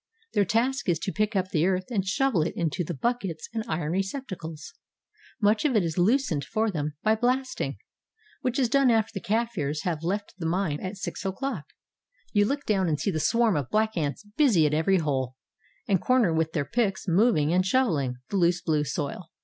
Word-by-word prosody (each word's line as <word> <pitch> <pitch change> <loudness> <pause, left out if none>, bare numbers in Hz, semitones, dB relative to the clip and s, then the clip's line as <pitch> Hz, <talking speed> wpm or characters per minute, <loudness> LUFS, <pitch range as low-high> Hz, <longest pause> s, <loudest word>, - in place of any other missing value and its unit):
Their 205 - +3
task 245 +4 0
is 170 - +3
to 190 - -3
pick 215 +2 -1
up 185 -1 0
the 165 +1 +2
earth 185 +3 -1
and 200 -5 +1
shovel 210 - +1
it 155 - -2
into 170 0 -1
the 175 +1 -4
buckets 195 - -2
and 225 -1 -2
iron 155 -3 -2
receptacles. 185 - -4 0.7
Much 210 0 +3
of 285 -5 +2
it 210 - +4
is 165 -2 -2
loosened 200 - +2
for 220 +9 0
them 150 -3 -3
by 215 - +4
blasting, 255 +3 -1 0.6
which 250 -1 -1
is 260 -3 +3
done 275 +2 +4
after 225 -2 +2
the 195 - -4
Kafirs 205 -10 -1
have 170 -5 -2
left 200 +5 -2
the 165 - -2
mine 165 -4 0
at 190 +2 -5
6 195 - -5
o'clock. 195 - -3 0.7
You 205 -2 +4
look 280 +5 -2
down 190 -4 +1
and 150 -2 0
see 200 - 0
the 160 - -2
swarm 230 +4 +3
of 140 -4 -2
black 220 0 +1
ants 155 +4 -2
busy 230 - +5
at 150 - +1
every 165 +5 +3
hole 135 -6 -1 0.5
and 195 -4 +2
corner 250 -9 +3
with 160 0 0
their 145 -4 0
picks 210 - -1
moving 175 -4 +3
and 185 +1 +3
shoveling 180 - +1
the 200 - -1
loose 175 -1 +3
blue 155 -3 +1
soil. 150 +3 -4
190 Hz, 200 wpm, -27 LUFS, 160-225 Hz, 0.7 s, busy